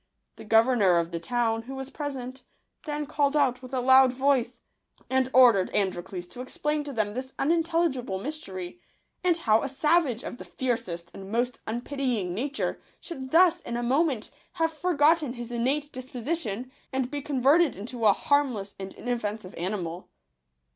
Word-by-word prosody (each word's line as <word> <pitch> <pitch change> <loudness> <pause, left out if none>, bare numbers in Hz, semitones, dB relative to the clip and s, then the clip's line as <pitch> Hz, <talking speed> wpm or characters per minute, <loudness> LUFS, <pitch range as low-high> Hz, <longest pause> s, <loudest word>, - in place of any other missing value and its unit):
The - - -10
governor 220 -4 +4
of 170 0 0
the 170 - -3
town, 225 +4 0
who 260 +4 -8
was 265 0 -6
present, 265 -3 -5 0.4
then 295 -1 -3
called 290 0 +1
out 255 -4 +2
with 255 -1 -10
a 260 -2 -1
loud 260 0 +6
voice, 255 -2 +1 0.5
and 260 0 +2
ordered 240 -8 +6
Androcles 185 -2 -1
to 245 - -8
explain 300 +3 -2
to 285 - -5
them 215 -5 -1
this 260 +2 -6
un 290 - +1
intelligible 325 - 0
mystery, 195 - -6 0.4
and 350 -2 +3
how 225 -9 +3
a 280 - -3
savage 285 -3 +2
of 245 - -7
the - - -7
fiercest 205 -10 -3
and 195 0 -9
most 240 +2 0
unpitying 240 -5 -2
nature 275 +9 -2 0.2
should 265 -6 -7
thus 345 +2 +5
in 235 -8 -5
a 240 - -2
moment 265 -2 +1 0.2
have 325 -2 0
forgotten 315 -4 +2
his 240 -1 -7
innate 275 +5 -1
disposi 260 +5 -3
tion, 240 +2 -5 0.2
and 265 -1 -1
be 290 -1 -3
converted 285 +3 +3
into 225 +3 -2
a - - +8
harmless 255 -9 0
and 190 0 -7
in - - -10
offensive 215 -5 -3
animal. 175 -1 -4
255 Hz, 170 wpm, -27 LUFS, 220-290 Hz, 0.5 s, a